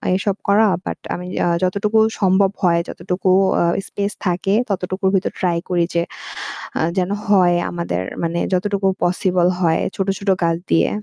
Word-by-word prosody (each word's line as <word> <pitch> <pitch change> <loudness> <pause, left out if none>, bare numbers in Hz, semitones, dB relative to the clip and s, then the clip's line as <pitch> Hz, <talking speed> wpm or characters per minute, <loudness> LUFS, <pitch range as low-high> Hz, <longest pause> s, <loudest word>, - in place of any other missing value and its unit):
এসব 195 0 0
করা। 210 +2 +5 0.2
বাট - - -4
আমি 180 - -5 0.2
আ - - +1 0.2
যতটুকু 205 +4 +1 0.2
সম্ভব 190 +1 +3
হয়, 170 -1 +4
যতটুকু 185 0 -2 0.3
আ - - +3 0.2
স্পেস 200 0 -2
থাকে, 185 +2 0 0.2
ততটুকুর 190 0 -1
ভিতর 190 - 0
ট্রাই 175 -2 +1
করি 175 -2 +2
যে 170 - +2 0.8
আ - - +1 0.2
যেন 180 0 +1 0.2
হয় 185 -4 +4
আমাদের 170 - -3 0.2
মানে 170 +1 -1
যতটুকু 195 +1 0 0.2
পসিবল 180 0 +2
হয় 165 -2 +2 0.2
ছোট, 195 0 -2
ছোট 200 0 -3
গাছ 165 0 +2
দিয়ে। - - +4
185 Hz, 160 wpm, -19 LUFS, 175-195 Hz, 0.8 s, করা